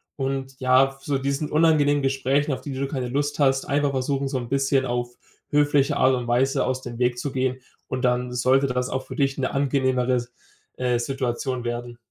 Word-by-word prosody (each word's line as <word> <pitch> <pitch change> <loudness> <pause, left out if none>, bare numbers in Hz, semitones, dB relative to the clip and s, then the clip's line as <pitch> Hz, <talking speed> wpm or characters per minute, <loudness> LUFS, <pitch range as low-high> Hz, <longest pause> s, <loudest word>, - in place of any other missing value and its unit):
Und 135 -1 -3
ja, 130 +1 +5
f 135 0 -16
so 140 -2 -1
diesen 140 +2 -2
unangenehmen 150 -2 +3
Gesprächen, 135 +2 +1
auf - - -5
die 140 - -6
du 135 +1 -2
keine 130 -4 -3
Lust 145 +3 -1
hast, 135 -1 +3
einfach 145 0 +1
versuchen, 135 +1 -1
so 135 -1 -2
'n 120 - -7
bisschen 135 -1 +1
auf 120 0 -2 0.4
höfliche 145 0 +3
Art 130 0 +4
und 125 -1 -4
Weise 125 +3 +2
aus 130 0 -1
dem 120 -2 -7
Weg 125 0 +1
zu 140 +1 -3
gehen 130 0 -1 0.3
und 130 0 -3
dann 125 0 +1
sollte 130 +3 +3
dann 125 - -4
das 125 0 0
auch 130 0 -3
für - - -8
dich 135 -1 0
'ne 130 - -1
angenehmere 130 -2 +1
S 120 0 -3 0.5
äh, 125 -1 +1
Situation 130 0 -2
werden. 120 0 -4
135 Hz, 210 wpm, -24 LUFS, 125-140 Hz, 0.5 s, ja